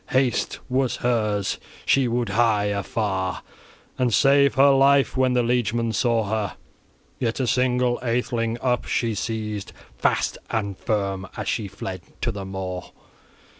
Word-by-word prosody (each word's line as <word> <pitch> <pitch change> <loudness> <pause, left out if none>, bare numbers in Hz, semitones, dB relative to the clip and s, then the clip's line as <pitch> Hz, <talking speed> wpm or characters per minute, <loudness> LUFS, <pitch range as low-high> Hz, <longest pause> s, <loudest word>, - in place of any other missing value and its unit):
Haste 130 -1 +1
was 130 0 +1
hers; 105 -4 0 0.3
she 135 -2 +3
would 120 -1 -1
hie 110 -1 +2
afar 95 -2 -2 0.6
and 125 -2 +2
save 140 +4 +4
her 140 +1 +6
life 135 0 +4
when 130 -1 +2
the 125 -1 +3
liegemen 115 -1 0
saw 115 +1 +2
her. 105 -1 -2 0.6
Yet 115 -1 -1
a 130 - +1
single 125 0 +1
atheling 115 -1 -1
up 125 -1 +1
she 115 -2 0
seized 105 -1 -4 0.3
fast - - +1
and 100 -3 -2
firm, 100 -2 -2
as - - -4
she 105 - -1
fled 95 -1 -6 0.2
to - - 0
the 100 -1 -6
moor. 95 -1 -5
115 Hz, 140 wpm, -24 LUFS, 100-125 Hz, 0.6 s, her